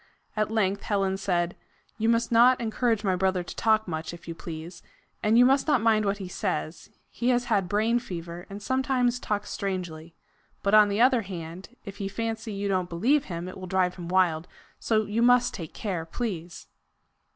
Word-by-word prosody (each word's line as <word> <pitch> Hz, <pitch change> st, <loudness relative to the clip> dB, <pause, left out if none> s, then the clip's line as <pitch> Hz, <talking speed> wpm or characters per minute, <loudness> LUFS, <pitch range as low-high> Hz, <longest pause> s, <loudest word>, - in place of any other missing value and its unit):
At 215 Hz, 0 st, 0 dB
length 200 Hz, -3 st, 0 dB
Helen 195 Hz, -2 st, 0 dB
said: 175 Hz, -3 st, -1 dB, 0.4 s
"You 225 Hz, +1 st, +2 dB
must 230 Hz, 0 st, +2 dB
not 245 Hz, +2 st, +6 dB
encourage 225 Hz, -1 st, 0 dB
my 190 Hz, -2 st, +2 dB
brother 185 Hz, -1 st, +1 dB
to -, -, -9 dB
talk 220 Hz, -1 st, +2 dB
much, 160 Hz, 0 st, -4 dB
if 170 Hz, -, -16 dB
you 165 Hz, -, -4 dB
please; 165 Hz, +1 st, -8 dB, 0.4 s
and 215 Hz, +2 st, +3 dB
you 245 Hz, -, +7 dB
must 270 Hz, +3 st, +3 dB
not 295 Hz, -4 st, +4 dB
mind 215 Hz, -1 st, +3 dB
what 200 Hz, 0 st, 0 dB
he 195 Hz, -2 st, -6 dB
says; 175 Hz, -4 st, -3 dB, 0.2 s
he 245 Hz, -, -1 dB
has 245 Hz, -1 st, +3 dB
had 200 Hz, -7 st, 0 dB
brain 220 Hz, +4 st, +2 dB
fever, 175 Hz, -5 st, -7 dB
and 200 Hz, +1 st, -8 dB
sometimes 260 Hz, -1 st, +1 dB
talks 205 Hz, -3 st, -3 dB
strangely. 175 Hz, -4 st, -4 dB, 0.5 s
But 200 Hz, -, +1 dB
on 210 Hz, -1 st, +7 dB
the 205 Hz, +3 st, 0 dB
other 250 Hz, -1 st, +5 dB
hand, 185 Hz, +3 st, -8 dB
if 200 Hz, -1 st, -8 dB
he 200 Hz, -, -3 dB
fancy 225 Hz, +1 st, -4 dB
you 200 Hz, 0 st, -3 dB
don't 185 Hz, -2 st, 0 dB
believe 250 Hz, -, +2 dB
him, 170 Hz, -1 st, -5 dB
it 185 Hz, -, -8 dB
will 185 Hz, -, -7 dB
drive 180 Hz, -1 st, +1 dB
him 175 Hz, -2 st, -8 dB
wild 175 Hz, -2 st, +2 dB, 0.3 s
so 220 Hz, -1 st, +1 dB
you 210 Hz, +3 st, -1 dB
must 245 Hz, 0 st, +4 dB
take 165 Hz, -3 st, -7 dB
care 185 Hz, -6 st, -3 dB
please." 175 Hz, -4 st, -5 dB
200 Hz, 195 wpm, -27 LUFS, 180-230 Hz, 0.5 s, you